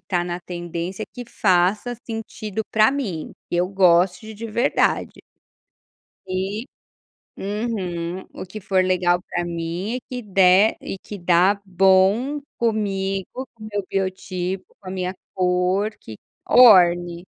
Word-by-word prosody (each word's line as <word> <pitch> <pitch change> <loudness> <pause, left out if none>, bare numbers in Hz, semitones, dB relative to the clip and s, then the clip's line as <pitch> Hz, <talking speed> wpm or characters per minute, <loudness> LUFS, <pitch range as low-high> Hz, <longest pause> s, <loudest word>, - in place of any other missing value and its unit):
está 175 -3 0
na 175 0 -4
tendência, 175 +3 -5
que 245 - -7
faça 200 +5 +1
sentido 220 -2 -5
para 220 +4 +4
mim. 200 - -4 0.2
Eu 175 +1 +1
gosto 180 -1 +3
de 220 0 -9
de 225 +2 -7
verdade. 235 +5 0 1.1
E 190 +4 -3 0.7
uhum. 190 -4 -3
O - - -8
que 215 +4 -8
for 190 -1 +2
legal 180 -1 +2
para 175 - -2
mim 175 +6 -3
e - - -5
que 250 -1 -5
der 195 0 +4
e 195 - -6
que 205 +1 -9
dá 180 +3 +3
bom, 195 +9 +3 0.2
comigo, 200 +1 -2
com 215 - -12
meu 205 -2 -2
biotipo, 185 -1 -3 0.2
com 190 - -10
a - - -4
minha 185 0 -3 0.2
cor, 185 +3 +1
que 110 - -11 0.3
orne. 175 -6 +6
190 Hz, 130 wpm, -22 LUFS, 180-215 Hz, 1.1 s, orne